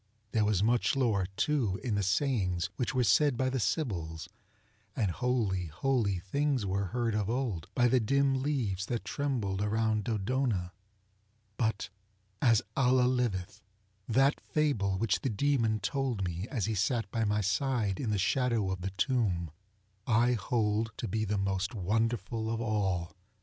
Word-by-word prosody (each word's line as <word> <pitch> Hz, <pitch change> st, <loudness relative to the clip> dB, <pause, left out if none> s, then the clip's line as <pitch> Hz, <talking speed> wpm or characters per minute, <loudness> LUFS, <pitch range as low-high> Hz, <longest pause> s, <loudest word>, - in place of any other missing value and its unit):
There 110 Hz, -2 st, +2 dB
was 105 Hz, -2 st, +2 dB
much 120 Hz, +4 st, +2 dB
lore 110 Hz, -8 st, +1 dB
too 120 Hz, -10 st, +1 dB
in 120 Hz, -5 st, -1 dB
the 100 Hz, -, +1 dB
sayings 95 Hz, -, 0 dB
which 125 Hz, +2 st, -2 dB
were 125 Hz, -, +3 dB
said 120 Hz, +6 st, +4 dB
by 130 Hz, +1 st, +1 dB
the 130 Hz, -, -1 dB
Sybils; 85 Hz, -, -2 dB, 0.7 s
and 105 Hz, -7 st, +1 dB
holy, 105 Hz, -6 st, 0 dB
holy 100 Hz, -, 0 dB
things 130 Hz, +6 st, -1 dB
were 100 Hz, +1 st, -1 dB
heard 115 Hz, +3 st, -1 dB
of 105 Hz, -1 st, -1 dB
old 115 Hz, -9 st, -2 dB
by 120 Hz, -1 st, +4 dB
the 125 Hz, +1 st, +3 dB
dim 135 Hz, +3 st, +2 dB
leaves 115 Hz, -9 st, -1 dB
that 120 Hz, -2 st, -3 dB
trembled 115 Hz, -9 st, -2 dB
around 110 Hz, 0 st, 0 dB
DodonaŌĆöbut, 105 Hz, -1 st, -3 dB, 0.5 s
as 115 Hz, -4 st, +4 dB
Allah 130 Hz, -1 st, +4 dB
liveth, 105 Hz, -6 st, -1 dB, 0.5 s
that 135 Hz, +5 st, +3 dB
fable 110 Hz, -11 st, 0 dB
which 105 Hz, 0 st, +1 dB
the 135 Hz, -, -1 dB
Demon 115 Hz, -2 st, +1 dB
told 125 Hz, -1 st, -1 dB
me 90 Hz, +3 st, -4 dB
as 115 Hz, -9 st, -1 dB
he 110 Hz, -, -1 dB
sat 110 Hz, +4 st, 0 dB
by 115 Hz, -, 0 dB
my 105 Hz, 0 st, +1 dB
side 105 Hz, 0 st, 0 dB
in 120 Hz, -, -2 dB
the 105 Hz, -, +1 dB
shadow 115 Hz, -1 st, +1 dB
of 95 Hz, -1 st, -4 dB
the 95 Hz, -, -2 dB
tomb, 105 Hz, -, 0 dB, 0.6 s
I 120 Hz, +1 st, +4 dB
hold 110 Hz, 0 st, 0 dB
to 115 Hz, -, -3 dB
be 110 Hz, +2 st, -1 dB
the 105 Hz, 0 st, -1 dB
most 95 Hz, +3 st, -1 dB
wonderful 110 Hz, +3 st, -1 dB
of 115 Hz, 0 st, -1 dB
all! 100 Hz, -7 st, -1 dB
110 Hz, 155 wpm, -30 LUFS, 100-125 Hz, 0.7 s, said